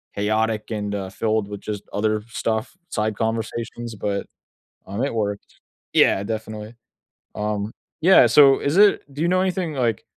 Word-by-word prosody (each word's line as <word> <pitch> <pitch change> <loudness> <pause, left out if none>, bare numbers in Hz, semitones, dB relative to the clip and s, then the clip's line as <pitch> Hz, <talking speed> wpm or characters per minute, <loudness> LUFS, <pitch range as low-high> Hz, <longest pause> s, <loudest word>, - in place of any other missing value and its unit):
chaotic 110 +2 0
and, 105 -1 -2
uh, 95 -1 -4
filled 110 +1 -1
with 105 -1 -7
just 105 -1 -5
other 110 0 0
stuff, 110 +7 -2
side 105 0 -1
conversations, 115 +1 -3
but, 100 0 -2 0.6
um, 100 +7 -2
it 140 - -2
worked. 105 -2 -3 0.3
Yeah, 100 - +4
definitely. 110 +1 -5 0.6
Um, 105 0 -2 0.3
yeah, 180 -7 +7
so 135 +3 +6
is 145 +6 0
it 205 0 +5
do 145 - -5
you 170 - +2
know 185 +1 +3
anything, 180 -4 -1
like 120 -6 0
110 Hz, 155 wpm, -22 LUFS, 105-120 Hz, 0.6 s, yeah